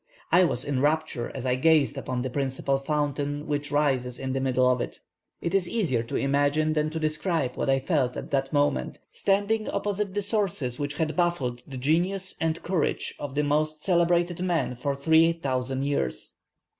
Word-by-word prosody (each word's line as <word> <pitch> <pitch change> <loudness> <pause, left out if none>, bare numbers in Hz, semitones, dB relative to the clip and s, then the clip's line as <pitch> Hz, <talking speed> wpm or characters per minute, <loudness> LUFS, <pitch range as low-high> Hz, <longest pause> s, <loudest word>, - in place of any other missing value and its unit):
I 180 +1 +6
was 125 -6 0
in 140 -2 -1
rapture 150 -4 0
as 130 -1 -5
I 125 - +2
gazed 150 +3 +3
upon 125 -1 -3
the 130 - -2
principal 135 0 -1
fountain 145 0 -2
which 145 -2 -2
rises 130 -4 +1
in 130 -1 -3
the 135 - 0
middle 130 -1 +2
of 125 -1 +2
it. - - -5 0.4
It 170 - -2
is 185 -3 +2
easier 170 - 0
to 115 - -6
imagine 145 +3 +2
than 155 0 +1
to 160 +1 -4
describe 155 -2 0
what - - -1
I 135 - +4
felt 135 -3 0
at - - -7
that 135 -1 0
moment, 145 - +1
standing 205 +2 0
opposite 205 -1 -2
the 205 - 0
sources 190 - -1
which 145 0 -2
had 155 0 -1
baffled 160 -9 0
the 135 -2 -7
genius 175 +8 0
and 165 0 -1
courage 175 -4 -1
of 145 -2 -6
the 150 - +2
most 150 +1 0
celebrated 175 -1 +2
men 175 -7 0
for 140 +3 -2
three 160 +3 +4
thousand 130 -4 -2
years." 140 - -2
145 Hz, 185 wpm, -26 LUFS, 135-170 Hz, 0.4 s, I